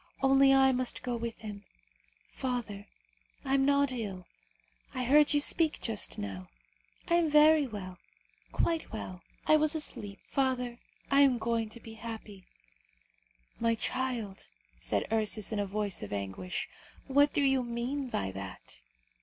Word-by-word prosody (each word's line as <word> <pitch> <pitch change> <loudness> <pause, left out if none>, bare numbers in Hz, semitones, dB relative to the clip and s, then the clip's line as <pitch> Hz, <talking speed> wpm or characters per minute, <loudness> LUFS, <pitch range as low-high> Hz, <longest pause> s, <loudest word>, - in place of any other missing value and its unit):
Only 270 0 +6
I 270 0 +6
must 255 -1 -2
go 245 -1 -2
with 230 0 -5
him. 205 -2 -7 0.7
Father! 235 -6 -4 0.6
I 270 - 0
am 270 0 +4
not 280 -1 +3
ill; 200 -7 -5 0.7
I 255 - -1
heard 290 +4 +5
you 290 - +4
speak 315 +2 +3
just 220 -3 0
now. 95 -2 -6 0.6
I - - +1
am 335 -2 +2
very 300 -1 +6
well, 185 -5 -8 0.5
quite 330 -1 0
well. 185 -4 -6 0.2
I 310 - +6
was 310 +1 +2
asleep. 205 -10 -2
Father, 250 -3 -1 0.3
I 275 0 +6
am 270 -3 +5
going 230 -1 -1
to 235 - -9
be 225 -1 -11
happy." 220 -4 -9 1.1
"My 230 0 +2
child," 230 -5 -3 0.3
said - - -1
Ursus 215 -1 +2
in 215 - -1
a 200 - -1
voice 205 0 -2
of 105 - -7
anguish, 100 - -4 0.4
"what 285 +1 +4
do 290 - +1
you 270 -1 +3
mean 245 +3 -3
by 95 - -2
that?" 95 -10 -9
235 Hz, 150 wpm, -30 LUFS, 205-270 Hz, 1.1 s, Only